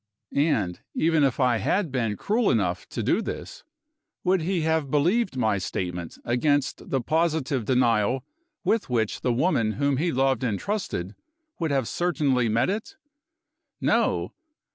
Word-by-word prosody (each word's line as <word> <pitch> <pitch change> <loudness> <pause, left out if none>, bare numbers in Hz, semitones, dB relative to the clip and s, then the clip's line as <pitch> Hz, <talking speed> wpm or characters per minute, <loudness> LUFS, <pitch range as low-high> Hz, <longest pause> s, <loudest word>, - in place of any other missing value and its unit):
And, 110 - +1 0.2
even 160 -2 +3
if 135 -1 +1
I 125 -3 +3
had 170 - 0
been 115 -6 -1
cruel 225 +3 +1
enough - - 0
to - - -3
do - - +2
this, - - -6 0.6
would 185 -1 +2
he 175 +1 0
have 160 -2 0
believed 175 - +1
my 110 -5 +1
statement 90 -2 -4
against 145 +3 0
the 135 - 0
positive 155 -4 0
denial 125 0 +2 0.4
with 220 -8 +1
which 115 -4 0
the 125 - +1
woman 120 -4 +1
whom 140 +5 +1
he 170 +4 +1
loved 135 -2 +1
and 110 -5 0
trusted 190 - -3 0.5
would 165 -2 0
have 135 -5 0
certainly 145 -9 +1
met 115 +2 +2
it? 210 +3 -3 0.8
No! - - +1
135 Hz, 145 wpm, -25 LUFS, 115-160 Hz, 0.8 s, even